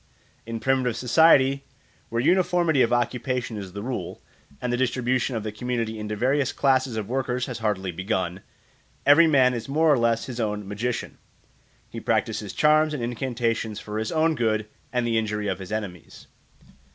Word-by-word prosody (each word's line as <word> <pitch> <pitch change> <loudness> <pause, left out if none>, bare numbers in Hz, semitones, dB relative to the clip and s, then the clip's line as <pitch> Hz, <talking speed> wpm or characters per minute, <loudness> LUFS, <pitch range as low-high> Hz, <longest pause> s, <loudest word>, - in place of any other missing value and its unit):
In 115 0 -4
primitive 130 -2 +1
society, 135 0 +4 0.5
where 115 - -1
uniformity 175 -3 +3
of 120 - +3
occupation 120 0 -1
is 95 -3 -7
the 100 0 -6
rule, 120 -8 -4 0.4
and 125 -1 -2
the 125 +1 +2
distribution 125 0 0
of 110 - -3
the 110 - -4
community 115 -1 -3
into 105 0 -4
various 130 +5 +1
classes 130 -4 +1
of 105 -2 -3
workers 125 0 -1
has 125 -4 -6
hardly 100 -4 -1
begun, 95 0 -2 0.6
every 160 +4 +7
man 130 -4 +4
is 120 +2 -5
more 155 +2 +4
or 135 - +2
less 115 -1 +1
his 125 -2 -7
own 105 -3 -2
magician; 115 +4 -4 0.7
he - - -7
practises - - -1
charms 155 0 +3
and 125 - -4
incantations 115 -3 -2
for 105 0 -5
his 110 - -3
own 160 0 +2
good 110 -5 0 0.2
and 125 -1 0
the 115 -1 +2
injury 105 -1 -2
of 95 -1 -2
his 95 +1 -8
enemies. 100 -6 -6
120 Hz, 170 wpm, -25 LUFS, 110-130 Hz, 0.7 s, every